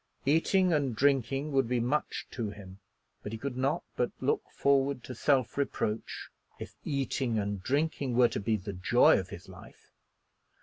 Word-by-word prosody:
Eating 170 +5 +3
and 140 -6 0
drinking 135 +2 +1
would 135 -3 +2
be 125 -1 +1
much 130 +6 -1
to 115 -4 -3
him; 100 -2 -11 0.4
but 105 - -6
he - - -3
could 135 +2 -4
not 135 +6 0
but 120 - 0
look 130 - +1
forward 140 -2 +1
to 130 - -7
self 130 +1 +1
reproach 110 -5 -2 0.3
if - - -8
eating 135 -4 -1
and 100 -2 -2
drinking 140 +1 0
were 120 -1 +5
to - - -3
be 110 +2 0
the 100 +1 -6
joy 90 0 +4
of - - -6
his - - -10
life. - - -15
130 Hz, 170 wpm, -30 LUFS, 110-140 Hz, 0.4 s, were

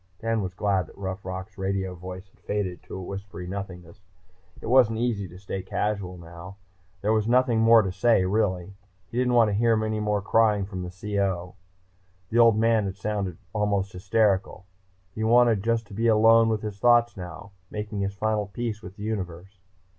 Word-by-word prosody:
Dan 115 +1 -1
was 95 -2 -5
glad 100 -2 0
that - - -17
Rough 95 0 -5
Rock's 95 +2 -7
radio 95 -1 -2
voice 90 +2 -9
faded 95 -2 -4
to - - -10
a 95 - -6
whispery 95 0 -7
nothingness. 90 -2 -7 0.6
It - - -10
wasn't 115 -2 +4
easy 115 -5 -1
to 90 - -13
stay 95 0 -5
casual 95 -1 -3
now. 85 +3 -11 0.5
There 105 +2 +2
was 110 -1 +1
nothing 125 -1 +3
more 115 0 +6
to 95 - -2
say, 95 0 +3
really, 95 -2 +1
and 100 +3 -13 0.4
he 120 - -2
didn't 125 -1 +2
want 115 -3 +5
to - - -1
hear 115 +2 +3
any 110 0 -2
more 105 -1 0
crying 105 -2 +3
from 95 -2 -6
the 90 - -5
CO. 95 -2 -2 0.8
The 115 - +2
Old 115 -2 +6
Man 115 -1 +3
had 95 -1 -5
sounded 100 -4 -3 0.2
almost 100 -2 0
hysterical. 95 0 0 0.5
He 110 - -4
wanted 115 -2 +4
just 115 0 0
to - - -11
be 115 +3 0
alone 115 +1 +5
with 110 -1 -1
his 105 -2 -5
thoughts 120 0 +4
now, 90 +2 -9 0.2
making 105 -1 -5
his 100 0 -2
final 105 0 -1
peace 110 +1 -4
with 95 -1 -10
the 105 - -9
universe.... 95 -3 -5
100 Hz, 190 wpm, -26 LUFS, 95-110 Hz, 0.8 s, more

